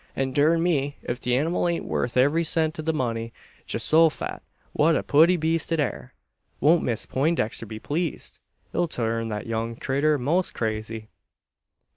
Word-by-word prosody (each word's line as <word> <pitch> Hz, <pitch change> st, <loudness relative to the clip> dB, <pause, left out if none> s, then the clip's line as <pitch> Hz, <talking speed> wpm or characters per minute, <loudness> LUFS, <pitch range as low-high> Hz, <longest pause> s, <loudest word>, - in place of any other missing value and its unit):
and 135 Hz, -1 st, -1 dB
durn 160 Hz, +4 st, +3 dB
me, 145 Hz, -5 st, 0 dB
ef 120 Hz, +1 st, -2 dB
the 125 Hz, -1 st, 0 dB
anymal 165 Hz, +5 st, +1 dB
ain't 170 Hz, -1 st, -1 dB
worth 120 Hz, -, -2 dB
every 145 Hz, +6 st, +3 dB
cent 160 Hz, 0 st, 0 dB
o' -, -, 0 dB
the 160 Hz, +1 st, 0 dB
money! 115 Hz, -6 st, -2 dB, 0.4 s
Geehosofat! 160 Hz, 0 st, +2 dB, 0.3 s
what 160 Hz, +2 st, +3 dB
a -, -, 0 dB
putty 165 Hz, +5 st, +5 dB
beest 165 Hz, +1 st, 0 dB
it 165 Hz, -, +1 dB
air! 120 Hz, -, -3 dB, 0.4 s
Won't 160 Hz, +4 st, +4 dB
Miss 115 Hz, -3 st, -1 dB
Peintdexter 135 Hz, -6 st, 0 dB
be 110 Hz, +1 st, -7 dB
pleezed! 160 Hz, +7 st, -3 dB, 0.3 s
It'll 175 Hz, -, +1 dB
turn 115 Hz, -5 st, -2 dB
that 105 Hz, -1 st, -4 dB
young 115 Hz, 0 st, -3 dB
critter 140 Hz, +5 st, +1 dB
'most 160 Hz, +8 st, 0 dB
crazy!" 110 Hz, 0 st, -3 dB
145 Hz, 160 wpm, -25 LUFS, 115-165 Hz, 0.4 s, putty